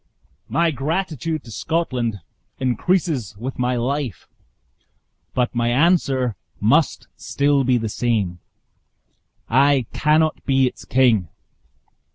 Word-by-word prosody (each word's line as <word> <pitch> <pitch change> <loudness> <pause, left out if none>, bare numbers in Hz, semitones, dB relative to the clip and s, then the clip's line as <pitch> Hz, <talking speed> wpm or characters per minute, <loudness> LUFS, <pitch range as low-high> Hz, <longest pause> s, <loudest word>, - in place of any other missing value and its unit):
"My 170 0 +2
gratitude 155 +1 -2
to 115 - -12
Scotland 125 - -2 0.4
increases 130 - 0
with 125 +5 -6
my 125 0 +1
life; 125 -4 -3 1.1
but 125 -1 0
my 120 -1 0
answer 135 - +2 0.2
must - - +2
still 140 -1 +1
be 125 -1 +3
the 110 -1 -2
same 105 -6 -1 1.1
I 135 +1 +3
cannot 155 +1 +2
be 135 -1 +3
its 125 - -4
king." 120 -8 +3
130 Hz, 105 wpm, -21 LUFS, 120-150 Hz, 1.1 s, be